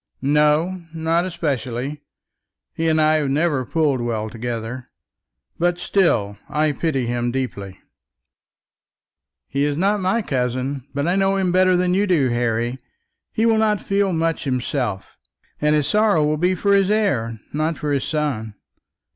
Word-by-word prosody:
"No, 150 +6 +2
not 165 +2 +1
especially. 145 -5 -3 0.7
He 165 0 0
and 160 0 +2
I 155 0 +4
have 145 -3 0
never 145 -1 +1
pulled 145 -2 0
well 110 -2 -2
together; 120 +1 -5 0.7
but 175 +1 +1
still 115 - +1
I 150 0 +1
pity 145 -4 -1
him 120 0 -1
deeply." 100 -7 -4 1.7
"He 140 +1 -1
is 145 0 0
not 200 +3 +1
my 195 +5 +1
cousin, 130 -1 -2
but 140 +2 0
I 175 - +2
know 195 0 +2
him 190 -2 +1
better 185 0 +4
than 180 0 +1
you 200 +2 +2
do, 155 -9 +2
Harry. 120 +1 -1 0.5
He 225 - 0
will 225 -1 +3
not 215 -2 +2
feel 195 0 0
much 165 -1 -1
himself, 125 -6 -2 0.4
and 150 0 +3
his 150 -2 +1
sorrow 205 -2 +3
will 150 +1 +1
be 180 +4 +1
for 200 +3 +1
his 195 -1 +3
heir, 130 - 0
not 155 +2 -1
for 150 - -3
his 140 -2 0
son. 130 -9 -2
150 Hz, 155 wpm, -21 LUFS, 125-180 Hz, 1.7 s, I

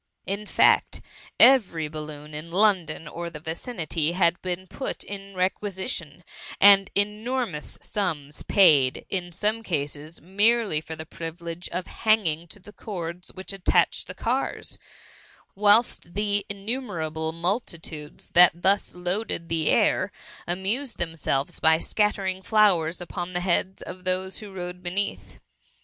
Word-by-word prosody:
In 200 +2 -4
fact, - - +4 0.4
every 190 - +5
belloon 150 0 -8
in 155 +2 -7
Lon« 190 -2 +4
don 155 0 -5
or 170 +2 -5
the 155 -2 -9
vicinity 165 - -2
had 175 -1 +2
been 185 0 -3
put 265 +9 -4
in 195 -1 -8
requid 190 +1 -1
tion, 165 +1 -6 0.4
and 195 -1 +7
enormous 210 -3 -2
sums 155 -8 -2
paid, 150 -9 +4
in 180 -2 -2
sooie 215 +6 -1
cases, 150 -2 -3
merely 205 -1 +2
for 160 0 -7
the 160 0 -8
privilege 165 +2 -7
of 180 - -3 0.2
banging 175 -7 +2
to 205 - -6
the 205 +2 -14
cords 180 -4 -6
which 190 +1 -5
attached 195 -2 +1
the - - -8
cars, - - -2 0.7
whilst 205 -3 +3
the 205 -1 +1
in 200 -1 -7
ihimerable 165 -10 -2
multitudes 165 -4 -4
that 175 -1 +6
thus 195 +2 +2
loaded 180 -1 -2
the 160 -2 +1
air, - - +3 0.4
amused 200 +10 0
themselves 165 -2 -1
by 160 0 +5
scattering 190 0 0
flow 210 -3 +4
ers 165 +3 -4
upon 175 +1 -5
the 180 - -1
heads 185 +1 0
of 185 - -9
those 185 +1 -1
who 210 -2 -9
lode 180 0 -5
be 175 - -4
neath. 200 +3 -4
180 Hz, 140 wpm, -25 LUFS, 165-205 Hz, 0.7 s, and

